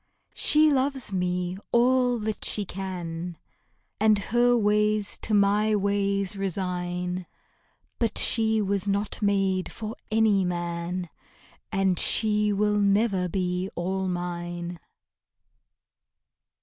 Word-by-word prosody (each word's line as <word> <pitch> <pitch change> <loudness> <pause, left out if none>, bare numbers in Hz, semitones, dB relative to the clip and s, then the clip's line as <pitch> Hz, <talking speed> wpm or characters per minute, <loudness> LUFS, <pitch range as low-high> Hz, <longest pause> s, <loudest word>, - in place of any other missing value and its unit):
She 305 0 +3
loves 265 -5 0
me 180 0 -1
all 245 0 +3
that 215 0 -3
she 205 - +1
can, 175 -3 -6 0.6
And 215 0 +4 0.2
her 245 0 +4
ways 210 -1 +2
to 215 - -1
my 205 +2 +3
ways 200 -1 0
resign; 180 -2 -3 0.7
But 230 -2 0
she 220 -1 +4
was 200 0 -1
not 200 +2 -2
made 195 -2 0
for 220 0 -6
any 215 -3 +3
man, 175 0 -3 0.6
And 190 -2 +2
she 210 -1 +3
never 205 0 +2
will 180 - -2
be 180 +1 -2
all 190 +2 -2
mine. 175 -1 -4
200 Hz, 105 wpm, -26 LUFS, 180-215 Hz, 0.7 s, And